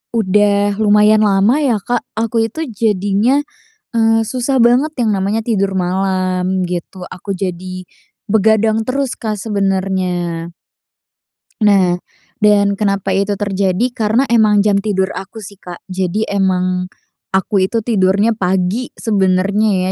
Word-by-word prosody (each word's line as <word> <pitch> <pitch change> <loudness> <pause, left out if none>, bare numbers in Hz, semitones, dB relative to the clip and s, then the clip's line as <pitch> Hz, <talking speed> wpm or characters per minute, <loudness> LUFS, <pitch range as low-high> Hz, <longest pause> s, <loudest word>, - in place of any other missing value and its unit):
udah 205 -1 +2
lumayan 210 +1 +4
lama 210 +8 +3
ya, 245 -7 +1
Kak, 240 +5 -2 0.2
aku 225 0 0
itu 320 +7 -5
jadinya, 210 +6 +1 0.5
eee, 225 0 +2
susah 255 +4 -1
banget 245 +5 +3
yang 220 -4 +1
namanya 200 +3 -1
tidur 200 -4 0
malam, 185 0 -1
gitu. 180 +1 -6
Aku 195 +1 -6
jadi 185 0 -5 0.4
begadang 220 +1 +2
terus, 260 +2 -2
Kak, 215 -3 -4
sebenernya. 190 -4 -2 1.1
Nah 190 -4 +3 0.4
dan 205 -1 +4
kenapa 195 -2 0
itu 200 +1 0
terjadi? 200 +1 0
Karena 220 +3 +1
emang 210 -3 +4
jam 200 -1 +3
tidur 190 -2 -1
aku 195 +4 -8
sih, 200 0 -12
Kak. 175 -1 -10
Jadi 190 +3 -1
emang 185 -2 0 0.4
aku 190 +1 +1
itu 230 - 0
tidurnya 205 0 +2
pagi 190 +4 -1
sebenernya 195 -1 +1
200 Hz, 125 wpm, -16 LUFS, 185-220 Hz, 1.1 s, lumayan